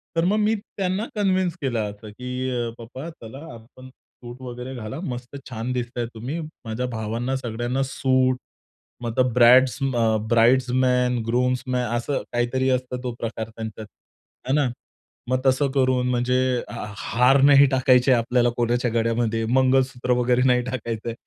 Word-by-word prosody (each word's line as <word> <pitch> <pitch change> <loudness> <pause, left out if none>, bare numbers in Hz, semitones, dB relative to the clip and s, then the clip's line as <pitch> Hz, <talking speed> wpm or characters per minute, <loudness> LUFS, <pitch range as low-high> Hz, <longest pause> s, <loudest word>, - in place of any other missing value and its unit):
तर 165 - +2
मग 205 +3 +2
मी 215 +1 +2
त्यांना 195 0 -3
कन्विंस 185 -4 +1
केलं 125 -5 -1
असं, 105 +1 -12
की 125 +3 -4
अ, 120 -2 -2
पप्पा 130 +7 -8
चला 125 -5 -11 0.2
आपण, 130 +3 -14
सूट 125 -1 -14
वगैरे 125 +1 -7
घाला. 115 +5 -6
मस्त 125 -2 -6
छान 115 +1 -4
दिसताय 120 -1 -3
तुम्ही. 130 +9 -5 0.3
माझ्या 115 +3 -3
भावांना 115 +4 -2
सगळ्यांना 120 +1 -2
सूट 130 -1 +1 0.7
मग 115 +1 -3
ब्राइड्स 125 +1 +6
अ, 115 -4 +1
ब्राइड्स 120 +2 +4
मॅन, 125 -1 +2
ग्रूम्सन 125 +2 0
मॅ 125 0 +1 0.2
असं 135 +4 -2
काहीतरी 130 +2 0
असतं 125 0 -7
तो 125 -2 -3
प्रकार 115 -1 -4
त्यांच्यात, 110 -1 -7 0.6
आहे 130 - 0
ना. 145 -3 +2 0.6
मग 130 0 +2
तसं 130 +1 +3
करून 130 -2 +1
म्हणजे 125 +1 +1 0.3
हा - - -5
हार 125 +4 +3
नाही 140 0 +7
टाकायचे 130 0 +4
आपल्याला 120 +1 +2
कोणाच्या 120 0 +1
गळ्यामध्ये, 115 -1 0
मंगळसूत्र 130 -1 +2
वगैरे 125 +1 +2
नाही 125 -1 +4
टाकायचंय. 115 -2 -4
125 Hz, 150 wpm, -23 LUFS, 120-130 Hz, 0.7 s, नाही